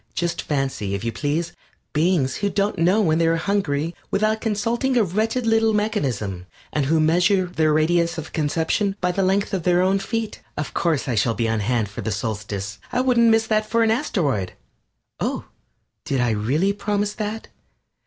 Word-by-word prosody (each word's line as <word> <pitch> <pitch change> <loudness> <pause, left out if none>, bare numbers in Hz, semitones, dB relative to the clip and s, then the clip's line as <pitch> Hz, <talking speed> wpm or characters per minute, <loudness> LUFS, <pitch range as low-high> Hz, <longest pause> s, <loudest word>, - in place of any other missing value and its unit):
Just 170 -1 -1
fancy, 135 -9 -2
if 100 - -5
you 115 - -1
please, 150 +9 -2 0.4
beings 155 -4 +1
who 205 - 0
don't 200 -2 -1
know 185 +6 +4
when 160 -4 +2
they 165 - +3
are 165 - +3
hungry 165 -4 -1 0.2
without 215 +2 +1
consulting 235 +4 0
a 230 - +5
wretched 220 +6 -1
little 225 0 +3
mechanism, 110 - -2 0.3
and 145 -3 0
who 160 +2 +3
measure 180 +5 +3
their 160 -3 +1
radius 170 +2 +2
of 160 -1 -7
conception 160 +6 0
by 180 0 +1
the 195 - -1
length 195 +2 +1
of 190 - 0
their 180 +1 +3
own 190 +1 +2
feet. 225 +2 -3 0.2
Of 150 - -4
course 160 -5 0
I 125 - 0
shall 115 +1 +1
be 115 - 0
on 110 -1 0
hand 110 +1 0
for 100 - -7
the 110 - -3
Solstice! 100 -1 -4
I 250 - 0
wouldn't 245 -3 +4
miss 225 0 +4
that 215 -1 0
for 230 0 +3
an 220 - +3
asteroid! 155 - 0 0.7
Oh, - - -2 0.6
did 135 - -1
I 120 -1 +2
really 135 - +1
promise 205 0 -1
that? 215 +1 -5
175 Hz, 185 wpm, -22 LUFS, 135-210 Hz, 0.7 s, a